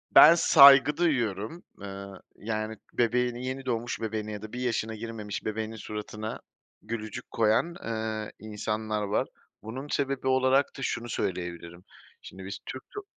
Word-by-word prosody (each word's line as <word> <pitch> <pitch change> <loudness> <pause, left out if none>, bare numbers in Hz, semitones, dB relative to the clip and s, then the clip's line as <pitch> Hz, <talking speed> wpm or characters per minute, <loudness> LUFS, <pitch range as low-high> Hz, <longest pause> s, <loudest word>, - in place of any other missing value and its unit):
Ben 170 - +10
saygı 140 -3 +8
duyuyorum. 120 - 0 0.2
Iıı, 100 -1 -8
yani 110 0 -3 0.2
bebeğini, 125 +1 +1
yeni 130 +1 -4
doğmuş 120 -1 -2
bebeğine 110 -1 -3
ya 105 -1 -6
da 110 +1 -9
bir 125 - -4
yaşına 115 -3 -1
girmemiş 110 -2 -6
bebeğinin 110 +1 -3
suratına 105 0 -6 0.4
gülücük 110 -1 -6
koyan, 115 +10 +2
ııı, 110 -1 -3
insanlar 110 0 -3
var. 100 0 0 0.4
Bunun 130 +6 -6
sebebi 140 -2 -1
olarak 130 +1 +4
da - - -7
şunu 120 -2 -2
söyleyebilirim, 85 -2 -4 0.4
şimdi 95 0 -10
biz 100 +1 -6
Türk 130 0 -7
top 410 -1 -6
110 Hz, 140 wpm, -28 LUFS, 105-130 Hz, 0.4 s, Ben